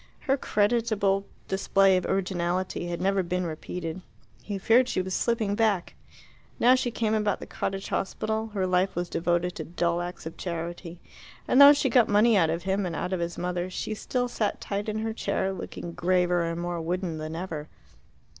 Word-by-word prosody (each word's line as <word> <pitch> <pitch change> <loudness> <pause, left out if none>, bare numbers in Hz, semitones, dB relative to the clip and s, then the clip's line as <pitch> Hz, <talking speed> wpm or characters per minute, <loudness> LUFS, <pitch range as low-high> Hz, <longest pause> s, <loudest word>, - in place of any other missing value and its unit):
Her 270 -2 +2
creditable 205 -4 +1 0.2
display 195 0 +3
of 185 - 0
originality 180 -1 -1
had 170 0 -3
never 195 +1 +2
been 180 +1 -2
repeated: 165 +2 -5 0.4
he 205 -2 -4
feared 230 +6 +4
she - - 0
was 185 0 -2
slipping 225 -2 0
back. 205 -4 +1 0.7
Now 245 +2 +6
she 255 -1 +1
came 220 -2 -1
about 210 -2 +1
the - - -7
Cottage 195 0 -4
Hospital 220 +3 -2
her 200 -3 -2
life 185 +1 +1
was 175 0 -2
devoted 175 +1 0
to 160 - -4
dull 170 +1 -1
acts 175 -1 -6
of 160 - -7
charity 170 0 -5 0.5
and 260 - +5
though 285 +1 +11
she 285 -1 +1
got 240 -2 +4
money 210 +2 +5
out 165 -5 +4
of 165 +1 -2
him 195 +2 0
and 165 - -4
out 180 - -2
of 185 - -1
his 170 0 -3
mother, 180 0 -2
she 215 - -4
still 245 +3 -2
sat 220 -3 -2
tight 205 +1 -3
in 215 - -2
her 220 0 -2
chair, 195 -3 -1
looking 175 -1 -7
graver 180 0 +2
and 165 0 -3
more 175 -1 -3
wooden 170 -1 -2
than 155 +1 -5
ever. 165 -4 -5
185 Hz, 190 wpm, -27 LUFS, 175-210 Hz, 0.7 s, though